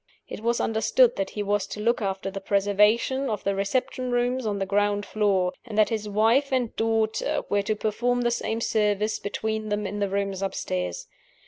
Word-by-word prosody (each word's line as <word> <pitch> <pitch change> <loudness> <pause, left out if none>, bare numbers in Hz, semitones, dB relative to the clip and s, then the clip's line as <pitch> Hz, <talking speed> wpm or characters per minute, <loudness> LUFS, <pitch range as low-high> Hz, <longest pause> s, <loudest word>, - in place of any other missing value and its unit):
It - - -7
was 235 +2 0
understood 225 +3 +3
that 195 - -1
he 210 - -4
was 205 -1 0
to - - -7
look 235 +3 +1
after 195 -1 -2
the 195 0 -6
preservation 210 +7 +2
of 210 -2 -3
the 200 - +1
reception 250 +5 -1
rooms 245 0 0
on 205 -1 -1
the 195 - -1
ground 205 +1 +1
floor; 195 -4 +1
and 225 -3 -7
that 215 - +5
his 215 -2 -3
wife 230 +7 +3
and 250 -3 0
daughter 225 -1 0
were 205 0 +2
to 215 +2 -1
perform 245 +4 0
the 240 0 +1
same 230 -1 -2
service 210 -1 +1
between 220 +1 -3
them 210 0 -1
in 205 +1 -4
the 200 -1 0
rooms 195 -1 -2
upstairs. 90 - -3
210 Hz, 195 wpm, -25 LUFS, 200-230 Hz, -, that